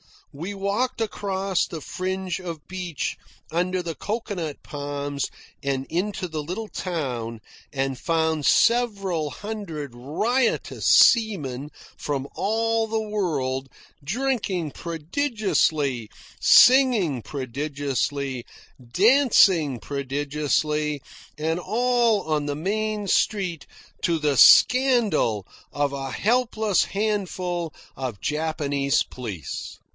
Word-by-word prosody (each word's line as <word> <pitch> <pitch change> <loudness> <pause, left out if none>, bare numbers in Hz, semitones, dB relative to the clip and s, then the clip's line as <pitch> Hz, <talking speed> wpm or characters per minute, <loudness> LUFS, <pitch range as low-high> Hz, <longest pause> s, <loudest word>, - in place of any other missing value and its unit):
We 170 +8 -5
walked 200 +6 -1
across 195 -3 -1
the 160 - -7
fringe 185 +3 -3
of 170 -5 -7
beach 180 -5 -4 0.3
under 180 +2 0
the 165 -1 -3
cocoanut 200 -7 -4
palms 145 -1 -3 0.4
and 135 -1 -1
into 190 +2 -2
the 155 -2 -4
little 190 +8 -5
town, 125 - -4 0.3
and 135 -2 -2
found 160 -3 0
several 200 -10 +2
hundred 185 - -6
riotous 210 - 0
seamen 150 - +4 0.3
from 140 -2 -3
all 225 +2 0
the 220 0 -1
world, 145 -11 -2 0.3
drinking 195 - -1
prodigiously, 165 - -1 0.3
singing 240 - +6
prodigiously, 140 -1 -3 0.4
dancing 185 - +4
prodigiously 145 +2 -1 0.4
and 160 +2 -1
all 235 +2 +2
on 155 -2 -1
the 145 -1 -2
main 210 +5 -2
street 185 -7 0 0.3
to 170 -2 +1
the 150 -3 0
scandal 225 - +5 0.3
of 145 -1 0
a 135 -1 -4
helpless 220 - +1
handful 185 -5 -2 0.3
of 125 -7 -5
Japanese 145 -3 0
police. 105 - -7
165 Hz, 95 wpm, -24 LUFS, 145-210 Hz, 0.4 s, singing